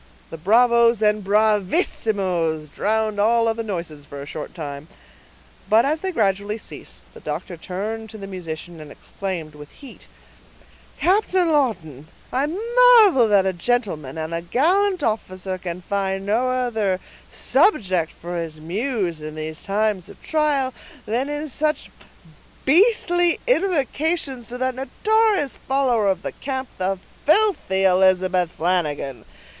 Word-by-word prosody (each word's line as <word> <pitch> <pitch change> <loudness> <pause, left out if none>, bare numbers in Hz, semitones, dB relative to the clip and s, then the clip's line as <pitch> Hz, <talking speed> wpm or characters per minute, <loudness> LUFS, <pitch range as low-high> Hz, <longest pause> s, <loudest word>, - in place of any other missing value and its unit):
The 165 - -6
bravos 235 +4 +4
and 210 -1 +2
bravissimos 195 - +1
drowned 215 +4 -1
all 230 +2 +3
other 225 0 0
noises 170 -8 -5
for 145 0 -10
a 140 - -7
short 155 +3 -7
time; 145 -2 -7 0.8
but 220 +4 +5
as 305 +3 0
they 380 - -2
gradually 205 - 0
ceased, - - -9
the - - -12
doctor 160 +4 -5
turned 215 +6 -5
to 220 - -10
the 200 - -8
musician, 175 -3 -7
and 150 - -10
exclaimed 170 -2 -6
with 150 -1 -12
heat,— 275 -3 -14 0.9
"Captain 370 -2 +2
Lawton, 175 - -1 0.3
I 270 +3 +1
marvel 445 - +5
that 200 -2 +4
a 190 - +1
gentleman, 175 - -2
and 160 +1 -4
a 165 - -2
gallant 355 - +1
officer, 185 -4 -2
can 180 0 -6
find 195 0 -2
no 230 +5 +1
other 225 -7 0 0.3
subject 185 - +2
for 175 +1 -7
his 160 -2 -6
muse, 185 - -2
in 155 0 -7
these 155 0 -5
times 205 -2 -1
of - - -14
trial, 290 -4 +1 0.3
than 245 +6 -1
in 295 +1 -3
such 305 +2 -2 0.7
beastly 350 - +3
invocations 320 - 0
to 245 - -6
that 255 0 -1
notorious 400 - +1
follower 255 -6 +1
of 190 0 -1
the - - -3
camp, 265 -1 -5
the 190 +1 0 0.3
filthy 315 - +2
Elizabeth 185 -1 +3
Flanagan. 155 -6 -1
210 Hz, 135 wpm, -22 LUFS, 180-270 Hz, 0.9 s, but